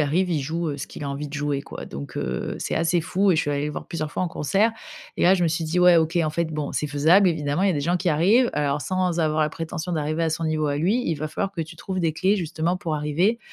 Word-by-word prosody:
arrive, 160 +6 +1
il 165 -4 0
joue, 160 +4 -2
heu, 140 - -4
ce 140 - -6
qu'il - - -8
a 140 - -3
envie 140 +2 -4
de - - -14
jouer, 145 -1 -1
quoi. - - -8
Donc, 70 +1 -8
heu, - - -3
c'est - - -2
assez 165 +1 +2
fou 190 +4 +1
et 170 - +3
je 165 - +2
suis 145 - -2
allée 145 0 -1
le 150 - -3
voir - - -6
plusieurs 155 -4 -4
fois 185 - -1
en - - -2
concert, 195 +9 +1 0.4
et - - -1
là, 185 +2 +6
je 180 - +1
me - - +3
suis 165 +1 -1
dit: 160 +3 -1
«Ouais, 180 0 +7
OK, 160 +1 +1
en 160 -3 +2
fait, 170 +2 -1
bon, 150 -2 -4
c'est 150 - -2
faisable. 160 +7 +5
Evidemment, 155 +1 -1
il 200 - +4
y - - +4
a - - +1
des 145 - -1
gens 175 +5 +1
qui 180 0 -1
y - - +4
arrivent, 200 +12 +4
heu, - - -3
alors 145 -1 0
sans 185 -2 0
avoir 155 0 +1
la 155 - +3
prétention 165 +2 -5
d'arriver 155 +1 -1
à 160 - 0
son 160 +1 -2
niveau 155 -1 0
à 145 -1 0
lui, 190 +11 +1
il 165 - +1
va 155 +1 -4
falloir 195 +5 -3
que 175 - -4
tu 165 +1 -6
trouves 185 +2 -4
des 165 -2 +1
clés 190 +5 +2
justement 170 -1 -1
pour 160 -4 -3
arriver. 165 +10 +1
160 Hz, 315 wpm, -24 LUFS, 150-180 Hz, 0.4 s, Ouais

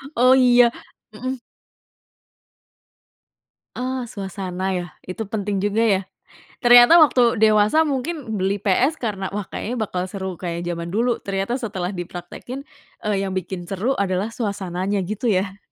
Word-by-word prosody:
Oh 255 +2 +6
iya, 245 -2 +5 0.4
mhm. 255 +5 -4 2.4
Oh, 255 0 -3
suasana 190 -3 -6
ya, 175 - -3 0.2
itu 220 +4 -4
penting 205 -1 -2
juga 205 +3 0
ya? 205 -4 +3 0.6
Ternyata 245 +4 +8
waktu 250 -5 +4
dewasa 215 +8 +5
mungkin 275 - -3
beli 195 +1 -1
PS 245 - +2
karena, 195 -4 -2
wah 210 - -1
kayaknya 240 - -4
bakal 185 -3 -2
seru 190 -2 -6
kayak 170 -1 -4
zaman 170 0 -4
dulu, 235 +2 +1
ternyata 195 +5 -2
setelah 190 -7 -3
dipraktekin, 180 +8 -7 0.4
eee, 210 -1 0
yang 190 - -4
bikin 185 -1 -4
seru 195 +7 -2
adalah 195 +2 0
suasananya, 200 -3 -2
gitu 210 +6 -4
ya? 195 -2 0
205 Hz, 135 wpm, -22 LUFS, 190-240 Hz, 2.4 s, Ternyata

